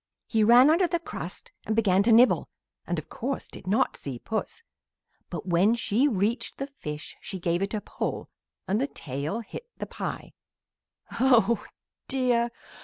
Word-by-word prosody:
"He 220 -2 +2
ran 245 +6 +7
under 350 +3 +4
the 345 - 0
crust 410 +7 -7
and 220 - -1
began 195 -4 +4
to 225 +3 +3
nibble 240 +3 +5 0.4
and, - - -1
of - - -5
course, - - -4
did - - -12
not 200 +4 +2
see 135 -3 -6
Puss; 220 - -4 0.7
but - - -5
when 185 +5 +3
she 235 +3 +2
reached 220 0 -1
the 275 - -2
fish 150 - -7
she 190 - -5
gave 175 0 0
it 200 +2 -1
a 210 - -2
pull - - -4 0.4
and 205 +5 +1
the 275 - +1
tail 150 - -4
hit 465 - -9
the - - -4
pie. - - -6 0.9
"Oh 235 -4 +4 0.4
dear! 245 -3 +2
225 Hz, 165 wpm, -27 LUFS, 190-255 Hz, 0.9 s, ran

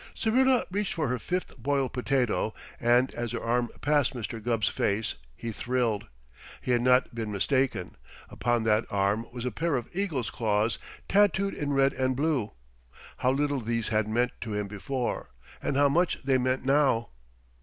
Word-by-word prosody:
Syrilla 255 +2 +3
reached 205 +1 -1
for 155 -6 0
her 125 0 -1
fifth 180 +8 -3
boiled 135 +1 0
potato, 125 -4 0 0.2
and 120 +2 +3
as 120 -1 -4
her 115 - -2
arm 120 0 +1
passed 145 -3 +2
Mr. 115 -1 -5
Gubb's 115 -3 +1
face 105 +2 0 0.2
he 115 +7 -5
thrilled. 115 -2 -1 0.5
He 125 - -2
had 120 -1 +3
not 125 0 +3
been 115 -2 -3
mistaken. 130 +6 0 0.3
Upon 120 -1 0
that 110 0 +3
arm 100 +3 0
was 120 0 -6
a 125 - -1
pair 160 +7 0
of 120 -2 -2
eagle's 155 - -1
claws, 110 0 0 0.3
tattooed 200 -1 +3
in 145 -1 -2
red 135 0 +3
and 130 0 0
blue! 140 -6 0 0.6
How 125 - +1
little 140 0 +1
these 115 0 -1
had 110 -1 +1
meant 120 +3 +1
to 110 -2 -3
him 105 -1 -1
before, 120 +5 -3 0.3
and 135 - -1
how 145 0 +5
much 170 +5 +2
they 130 -1 +3
meant 130 +1 0
now! 135 -4 +3
125 Hz, 170 wpm, -28 LUFS, 115-140 Hz, 0.6 s, how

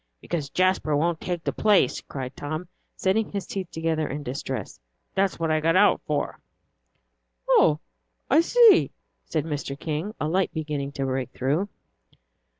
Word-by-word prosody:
"Because 150 - -3
Jasper 185 -4 +2
won't 165 +2 0
take 175 -2 -3
the - - -1
place," 205 -11 +3
cried 130 -1 -6
Tom, 155 +4 -5 0.3
setting 205 +3 +1
his 200 -2 -3
teeth 190 -3 -5
together 160 -1 -1
in 145 +2 -5
distress. 130 +1 -5 0.3
"That's 195 0 +1
what 165 -1 0
I 155 - +3
got 165 +2 +2
out 205 +2 +5
for." 150 -1 -2 1.1
"Oh, 150 -1 +5 0.5
I 320 - +5
see," 465 +4 +6 0.4
said 155 -2 -2
Mr. 145 -2 -4
King, 165 +7 -3
a 150 - -1
light 185 +4 +1
beginning 150 -3 -3
to 135 - -2
break 130 -1 -2
through. 150 +10 0
160 Hz, 150 wpm, -25 LUFS, 145-185 Hz, 1.1 s, see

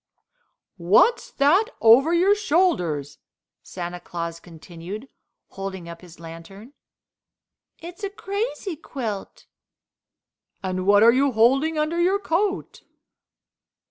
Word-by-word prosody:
"What's 310 - +3
that 310 +10 +3
over 245 +8 +6
your 360 +4 +4
shoulders?" 300 - 0 0.4
Santa 175 -1 -7
Claus 170 -1 -6
continued, 175 - -10 0.4
holding 190 -3 -7
up 170 0 -10
his 175 -3 -15
lantern. 170 - -12 1.0
"It's 350 +5 -11
a 400 - -2
crazy 400 -1 -4
quilt." 230 -9 -7 1.2
"And 185 0 -3
what 205 +1 +6
are 235 +1 +7
you 270 +1 +2
holding 270 +8 +3
under 310 +3 0
your 375 +3 +2
coat?" 390 +1 -2
235 Hz, 105 wpm, -23 LUFS, -, 1.2 s, are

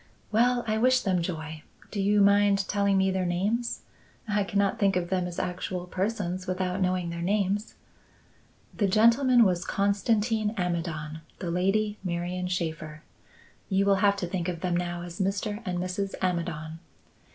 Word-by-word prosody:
"Well! 240 +2 +3
I 220 -1 0
wish 255 +2 +4
them 185 -3 +1
joy. 160 -3 -5 0.3
Do 200 - -2
you 205 +1 +3
mind 200 -1 +4
telling 200 -1 +2
me 190 0 +3
their 190 0 0
names? 205 +7 -1 0.5
I 205 -1 +1
cannot 200 0 0
think 195 -2 +3
of 175 0 -1
them 180 -1 +1
as 175 - -7
actual 180 0 -3
persons 185 -1 -2
without 185 +1 -1
knowing 180 -2 0
their 170 0 -5
names." 200 +3 0 1.0
"The 205 - +1
gentleman 235 +5 +5
was 180 -2 +1
Constantin 210 +2 +1
Amidon; 165 -3 -3 0.2
the 175 - -4
lady, 205 +4 +1
Marian 180 0 -2
Shaffer. 160 -3 -4 0.7
You 195 0 +2
will 200 -1 +4
have 200 -1 +4
to 195 - -3
think 175 0 -2
of 170 -2 -5
them 180 -2 0
now 175 0 -2
as 175 +1 -9
Mr. 200 +2 -1
and 180 -1 -1
Mrs. 185 +2 -2
Amidon." 165 -3 -2
190 Hz, 160 wpm, -27 LUFS, 175-205 Hz, 1.0 s, gentleman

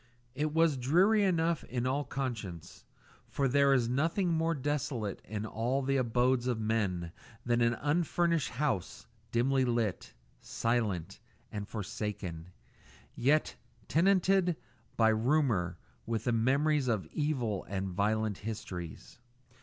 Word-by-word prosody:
And 145 - -4
it 155 0 +1
was 165 -3 +4
dreary 180 - +4
enough 170 -3 +1
in 125 -1 -3
all 135 +3 0
conscience, 115 - -5 0.4
for 140 - 0
there 140 +2 +4
is 125 -4 +3
nothing 165 - +1
more 165 +1 +1
desolate 130 -7 -2
in 105 +1 -4
all 120 +5 -1
the 135 +1 +1
abodes 125 0 +2
of 120 -3 0
men 100 -6 -1 0.3
than 120 0 +2
an 120 0 +3
unfurnished 165 +2 +1
house 125 - -2 0.3
dimly 130 +3 +2
lit, 115 -6 -1 0.3
silent, 110 -8 -1 0.3
and 105 -1 -5
forsaken, 105 -4 -4
and 80 0 -10 0.7
yet 150 +5 +2 0.3
tenanted 185 +1 +3 0.4
by 110 -1 +5
rumour 110 - +1 0.3
with 115 -1 -1
the 120 - +1
memories 135 +5 +2
of 110 -5 0
evil 130 - -1
and 95 -1 -3
violent 105 +2 0
histories. 95 -4 -7
125 Hz, 130 wpm, -31 LUFS, 110-150 Hz, 0.7 s, by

